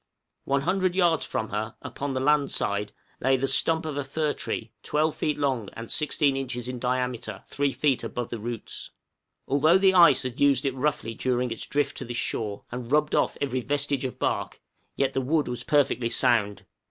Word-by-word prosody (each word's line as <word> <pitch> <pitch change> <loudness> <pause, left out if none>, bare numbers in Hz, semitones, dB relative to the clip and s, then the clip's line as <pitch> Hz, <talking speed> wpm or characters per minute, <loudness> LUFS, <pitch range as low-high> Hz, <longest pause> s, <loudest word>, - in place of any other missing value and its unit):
One 140 0 +1
hundred 185 +3 +1
yards 175 -4 +3
from 110 - -2
her, 105 +2 -3
upon 140 -1 -4
the 130 - -1
land 145 +1 +3
side, 100 +1 -1 0.3
lay 135 +1 +3
the 135 +2 0
stump 160 +4 +2
of 150 -2 -4
a 145 - -1
fir 150 +2 -1
tree 115 -1 -4
12 155 +1 0
feet 150 -1 -1
long, 130 -8 -1
and 115 0 -7
16 150 -2 +1
inches 125 -3 -4
in 125 -1 -4
diameter 125 -2 -1
at 95 - -16
3 140 -1 0
feet 140 -2 +1
above 120 -2 -4
the 115 - -4
roots. 115 +1 -5 0.6
Although 155 +6 +4
the 190 0 +4
ice 170 -7 +7
had 125 -1 -5
used 140 -2 +4
it 135 - +1
roughly 135 -3 -1
during 125 +1 -1
its 115 - -4
drift 145 -1 0
to - - -4
this 120 0 -4
shore, 105 -4 -2
and 125 0 -6
rubbed 150 0 +2
off - - +1
every 130 -3 -1
vestige 145 0 -1
of 130 - -4
bark, - - -2 0.4
yet 135 -1 0
the 135 - 0
wood 150 +4 +1
was 125 -1 -4
perfectly 140 -5 +2
sound. 115 -5 +2
135 Hz, 200 wpm, -26 LUFS, 120-145 Hz, 0.6 s, ice